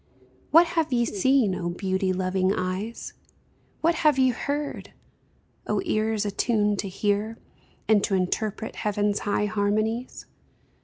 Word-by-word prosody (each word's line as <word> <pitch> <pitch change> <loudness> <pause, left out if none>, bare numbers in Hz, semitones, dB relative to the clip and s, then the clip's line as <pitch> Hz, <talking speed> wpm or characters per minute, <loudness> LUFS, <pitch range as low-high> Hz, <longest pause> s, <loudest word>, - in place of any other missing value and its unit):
What 330 +3 +7
have 330 -3 -1
ye 240 -1 +2
seen, 230 0 +2
O 175 -1 -3
beauty 190 +1 -1
loving 185 0 0
eyes? 185 +5 -4 0.7
What 335 +2 +3
have 300 -3 +4
ye 260 -1 +4
heard, 285 +4 -4 0.7
O - - 0
ears 215 - 0
attuned 210 -1 +1
to 195 - -3
hear 205 +3 -1 0.5
And 215 -2 +4
to 200 - 0
interpret 205 +4 -2
heaven's 205 0 0
high 205 0 0
harmonies 215 +3 -1
210 Hz, 125 wpm, -25 LUFS, 195-235 Hz, 0.7 s, What